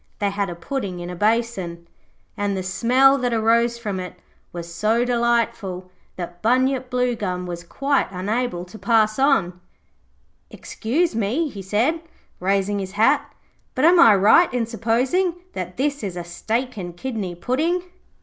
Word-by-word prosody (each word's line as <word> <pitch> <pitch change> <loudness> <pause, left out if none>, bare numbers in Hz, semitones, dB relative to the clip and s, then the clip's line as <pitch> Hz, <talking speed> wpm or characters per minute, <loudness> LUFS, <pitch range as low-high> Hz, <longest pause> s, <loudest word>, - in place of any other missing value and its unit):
They 200 -1 0
had 200 -1 -2
a 175 - -5
pudding 190 -1 -4
in 175 0 -6
a - - -6
basin, 200 -5 -1 0.5
and 205 -1 -1
the 185 - -3
smell 255 +8 +4
that 245 -2 0
arose 230 +1 +2
from 205 -5 -4
it 180 -1 -7 0.4
was 170 -1 -7
so 220 +7 +1
delightful 235 -6 -1 0.2
that 175 -1 -7
Bunyip 255 +2 +1
Bluegum 230 -8 -1
was 175 -1 -6
quite 275 +10 0
unable 195 0 -2
to 185 +4 -12
pass 215 +2 +2
on. 195 -11 +2 0.9
'Excuse 305 +9 -2
me,' 235 +9 0
he 200 -6 -8
said, 230 - 0 0.4
raising 195 +2 0
his 190 -1 -5
hat, 225 +8 +2 0.4
'but 260 - +2
am 345 +1 +6
I 225 -7 +8
right 215 - +5
in 245 -2 0
supposing 250 +11 0 0.2
that 180 -1 -6
this 285 +2 -1
is 185 -3 -4
a 175 - -4
steak 225 +8 -3
and 175 -3 -6
kidney 210 -7 -4
pudding?' 310 - 0
220 Hz, 155 wpm, -22 LUFS, 185-250 Hz, 0.9 s, I